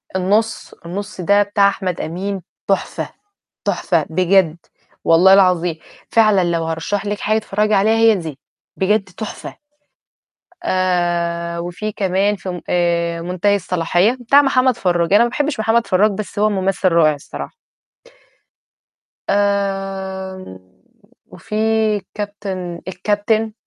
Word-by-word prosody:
النُص، 210 +5 0
النُص 200 +2 -6
ده 200 +3 +4
بتاع 200 0 +3
أحمد 185 -3 -2
أمين 190 +4 -4 0.3
تحفة، 195 - -1 0.6
تحفة 165 -5 0
بجد 180 -1 +3 0.5
والله 180 +4 +6
العظيم، 180 -4 +3 0.3
فعلًا 215 -5 +4
لو 170 -1 0
هارشّح 165 +6 -3
لكِ 205 0 -3
حاجة 215 +1 +1
تتفرّجي 210 0 0
عليها 215 +3 +3
هي 225 -1 +5
دي، 160 -7 -6 0.4
بجد 200 +1 +1
تحفة، 190 +3 -8 1.1
آآ 175 -2 0
وفي 175 +5 -4
كمان 195 +2 0
في 190 - -9
م 180 - -5
آآ 170 -1 0
منتهي 185 +3 +1
الصلاحية 180 +5 +1
بتاع 280 +5 +5
محمد 255 -3 +2
فرّاج، 175 -3 0
أنا 220 +3 +6
ما - - 0
باحبش 290 -3 -2
محمد 225 +1 +2
فراج 205 +4 +3
بس 205 0 -6
هو 215 +1 +3
ممثل 195 -1 0
رائع 165 -3 +4
الصراحة. 145 - -8 1.8
آمم، 195 - -2 0.7
وفي 210 - -9 0.6
كابتن 195 -4 -5
الكابتن، 210 +4 0
195 Hz, 120 wpm, -18 LUFS, 175-210 Hz, 1.8 s, والله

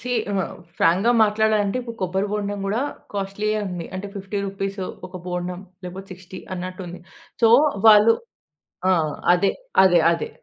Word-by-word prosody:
See, 250 - -5 0.2
ఆహ్, 190 -3 -2 0.2
ఫ్రాంక్‌గా 190 +8 +3
మాట్లాడాలంటే, 215 +1 +1 0.2
కొబ్బరి 190 +2 -1
బొండం 205 -1 -2
కూడా 215 +5 0 0.3
కాస్ట్లీయే 205 +2 -2
ఉంది. 175 -2 -5
అంటే 190 +2 -4
50 200 +1 -4
రూపీస్ 195 +1 -4 0.3
ఒక 185 0 -9
బొండం, 180 0 -4 0.2
లేకపోతే 185 +2 -8
60 185 +1 -11 0.2
అన్నట్టు 185 +1 -6
ఉంది. 175 +1 -9 0.4
సో, 225 - +7 0.4
వాళ్ళు 215 +1 +8 0.8
ఆ! - - +5 0.4
అదే. 185 +2 +2 0.3
అదే, 175 -2 +5
అదే. 165 -2 -2
195 Hz, 140 wpm, -22 LUFS, 180-210 Hz, 0.8 s, వాళ్ళు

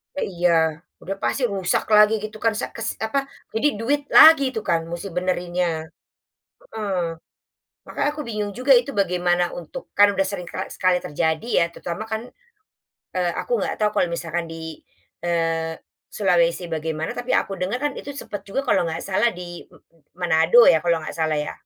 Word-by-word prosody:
Ya - - -1
iya 175 0 +2 0.5
udah 195 +2 -4
pasti 270 - 0
rusak 195 -5 0
lagi 210 +1 +7
gitu 215 0 -6
kan 225 -1 +1
sek - - -4
kes 230 0 -3
apa 275 +5 -1 0.2
jadi 225 +7 +1
duit 285 +5 +1
lagi 315 -3 +8
itu 220 - -2
kan 170 -1 +1
musti 170 +3 -6
benerinnya 175 -2 -2 0.8
heeh, 205 -4 -2 0.9
makanya 290 - -1
aku 300 - -7
bingung 210 -2 -3
juga 270 +2 +4
itu 245 +3 +3
bagaimana 180 -1 +1
untuk 165 - -8 0.2
kan 205 0 +7
udah 195 0 +1
sering 180 -3 -5
kali 190 - -4
sekali 185 -1 +2
terjadi 160 +5 -2
ya 170 - +4
terutama 175 +6 -5
kan, 220 +1 -1 0.9
eee, 175 -1 +1
aku - - -6
nggak - - -1
tahu 210 - +3
kalau - - +3
misalkan 170 0 -3
di, 160 -1 -8 0.5
eee, 165 -1 0 0.4
Sulawesi 175 -3 +2
bagaimana 160 0 -3
tapi 245 +1 -5
aku 195 - +1
dengar 195 +7 -1
kan 290 - 0
itu 285 0 -7
sempat 205 -7 -6
juga 200 +7 -2
kalau 170 - +3
nggak 165 0 -4
salah 200 +4 +2
di, 175 -1 -9 0.5
Manado 175 +5 +4
ya 160 - +4
kalau 170 -2 +1
nggak - - -7
salah 160 -1 +1
ya, - - -4
180 Hz, 170 wpm, -23 LUFS, 170-215 Hz, 0.9 s, lagi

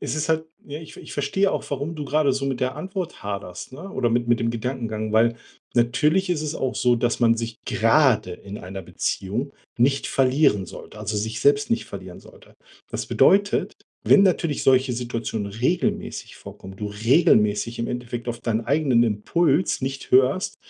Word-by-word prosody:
Es - - -3
ist 155 +1 -2
halt, 160 0 +1 0.2
ja, 145 +2 -7
ich 160 - -12
ich - - -10
verstehe 190 +8 +1
auch, - - -2
warum 145 +4 -3
du 150 - -4
grade 145 -2 +2
so 135 +1 -2
mit 135 -2 -2
der 130 +2 -1
Antwort 185 +1 -5
haderst, 100 +1 -6
ne? 180 +9 -9
Oder 120 - 0
mit 120 0 0
mit 120 - +3
dem 115 - +1
Gedankengang, 115 -2 -3
weil, 115 +1 +4 0.4
natürlich 150 +10 +2
ist 155 -3 0
es 155 0 -3
auch 130 -4 -2
so, 125 -1 +3
dass 120 0 0
man 115 -1 +4
sich 115 -1 -4
grade 115 -5 +3
in 100 +3 -9
einer 95 +1 -7
Beziehung 115 +11 -3 0.3
nicht 135 +3 +2
verlieren 130 - +2
sollte - - -11
also, 105 - -3
sich 110 +2 -3
selbst 145 +4 +3
nicht 230 - +1
verlieren - - -9
sollte. - - -18 0.4
Das - - -4
bedeutet, 200 +1 +3 0.3
wenn 200 - +6
natürlich 170 -5 +1
solche 130 -1 +3
Situationen 115 -3 -3
regelmäßig 125 - -2
vorkommen, 95 0 -11
du 105 - -4
regelmäßig 110 -1 +2
im 115 - -2
Endeffekt 120 0 -5
auf 120 -1 -4
deinen 115 -1 -1
eigenen 135 -4 +3
Impuls 140 - +1
nicht 135 +1 -4
hörst, 140 +10 +3
125 Hz, 180 wpm, -23 LUFS, 115-150 Hz, 0.4 s, wenn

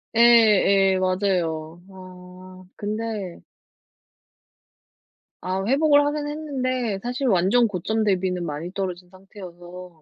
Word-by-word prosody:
예예 210 -5 +5
맞아요. 175 -4 -2
아. 185 0 -13
근데 210 -3 -5 2.0
아. 190 +1 -3
회복을 290 +4 +3
하긴 290 0 -2
했는데 255 -8 -3
사실 250 +4 -3
완전 210 +4 +3
고점 215 +3 -2
대비는 185 -3 -1
많이 155 +4 -6
떨어진 180 -2 -5
상태여서 180 -3 -13
190 Hz, 210 characters per minute, -23 LUFS, 180-230 Hz, 2.0 s, 예예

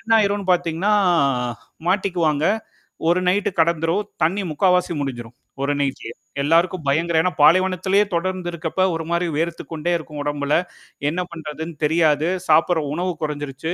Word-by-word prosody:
என்ன 225 - -12
ஆயிருன்னு 200 -2 +1
பாத்தீங்கன்னா 175 +3 0 1.0
மாட்டிக்குவாங்க. 175 -6 +1 0.7
ஒரு 175 +2 +3
நைட் 195 +3 +2
கடந்துரும். 170 +4 +1 0.2
தண்ணி 185 +6 +1
முக்காவாசி 180 +2 +2
முடிஞ்சிரும். 120 -3 -5 0.3
ஒரு 140 +1 +1
நைட்லேயே. 135 -4 -3 0.3
எல்லாருக்கும் 170 +2 +2
பயங்கர, 165 +3 +1
ஏன்னா 180 - +1
பாலைவனத்திலேயே 185 +4 +4
தொடர்ந்து 185 0 -2
இருக்கிறப்ப, 170 +2 -2
ஒரு 165 0 -4
மாதிரி 170 +1 +1
வேர்த்துக்கொண்டே 165 0 -2
இருக்கும் 150 -2 -9
ஒடம்புல. 145 0 0 0.6
என்ன 180 +2 -2
பண்றதுன்னு 160 0 -6
தெரியாது. 155 0 +2 0.2
சாப்பிட்ற 160 +1 +4
உணவு 180 +2 -1
குறைஞ்சிருச்சு. 145 +1 -4
170 Hz, 125 wpm, -21 LUFS, 150-180 Hz, 1.0 s, பாலைவனத்திலேயே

